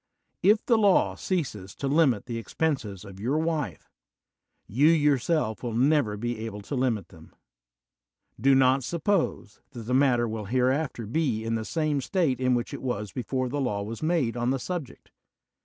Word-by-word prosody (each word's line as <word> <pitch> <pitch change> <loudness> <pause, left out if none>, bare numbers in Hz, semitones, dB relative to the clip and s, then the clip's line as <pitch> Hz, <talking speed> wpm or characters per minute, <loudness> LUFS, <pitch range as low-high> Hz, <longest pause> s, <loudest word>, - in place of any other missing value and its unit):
If 210 +3 +4
the 235 -5 +3
law 200 -3 +4
ceases 120 - -3
to 140 - -3
limil 135 -7 +3
the 120 -2 -4
expenses 115 - -2
of 95 -1 -11
your 125 +8 0
wife, 160 -3 -2 0.8
you 135 +9 +3
yourself 150 -6 +2
will 120 -3 -4
never 130 -4 +2
be 120 0 -3
able 105 -2 -6
to 100 - -8
limit 120 -8 0
them. 80 -2 -16 1.0
Do 135 +4 +4
not 130 0 +4
suppose 170 - -1
that 120 -3 -7
the 125 +3 -3
matter 130 -3 +3
will 110 -1 -4
hereafter 130 +2 0
be 120 -2 -1
in 115 0 -2
the 110 -1 -1
same 155 -2 0
state 160 -4 0
in 130 -1 +2
which 120 0 -3
it - - -6
was 105 -6 -3
before 130 0 -2
the 145 +3 -2
law 105 -6 -1
was 110 +3 -6
made 155 -8 +1
on 120 0 0
the 135 - +1
subject. 160 +1 -6
130 Hz, 175 wpm, -27 LUFS, 115-150 Hz, 1.0 s, If